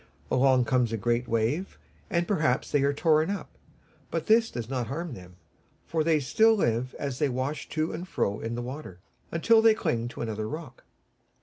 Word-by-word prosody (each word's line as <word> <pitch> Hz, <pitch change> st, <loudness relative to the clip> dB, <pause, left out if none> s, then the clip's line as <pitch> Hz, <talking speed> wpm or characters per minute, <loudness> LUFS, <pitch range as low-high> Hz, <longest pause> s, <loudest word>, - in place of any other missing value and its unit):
Along 130 Hz, -1 st, +4 dB
comes 125 Hz, -2 st, +1 dB
a 115 Hz, -, -1 dB
great 120 Hz, +3 st, 0 dB
wave, 115 Hz, -, -1 dB, 0.3 s
and 170 Hz, -2 st, 0 dB
perhaps 155 Hz, -10 st, +1 dB
they 145 Hz, -, +3 dB
are 140 Hz, +1 st, +3 dB
torn 155 Hz, +2 st, +2 dB
up; 200 Hz, -1 st, -5 dB, 0.5 s
but -, -, -2 dB
this 225 Hz, +1 st, +4 dB
does 120 Hz, -3 st, -5 dB
not 125 Hz, -2 st, -2 dB
harm 160 Hz, +4 st, -4 dB
them, 90 Hz, -4 st, -12 dB, 0.5 s
for 160 Hz, -1 st, 0 dB
they 160 Hz, -1 st, +3 dB
still 220 Hz, -, +4 dB
live 125 Hz, -, 0 dB
as 140 Hz, -3 st, -4 dB
they 150 Hz, -, +2 dB
wash 130 Hz, +4 st, -3 dB
to 155 Hz, 0 st, -1 dB
and 180 Hz, -, -6 dB
fro 100 Hz, -, -1 dB
in 115 Hz, +1 st, -4 dB
the 120 Hz, -, -4 dB
water, 125 Hz, -8 st, -7 dB, 0.3 s
until 220 Hz, +7 st, +4 dB
they 225 Hz, -1 st, +6 dB
cling 115 Hz, -, -1 dB
to 120 Hz, -, -8 dB
another 110 Hz, -2 st, -3 dB
rock. 150 Hz, -5 st, -8 dB
135 Hz, 190 wpm, -27 LUFS, 120-165 Hz, 0.5 s, they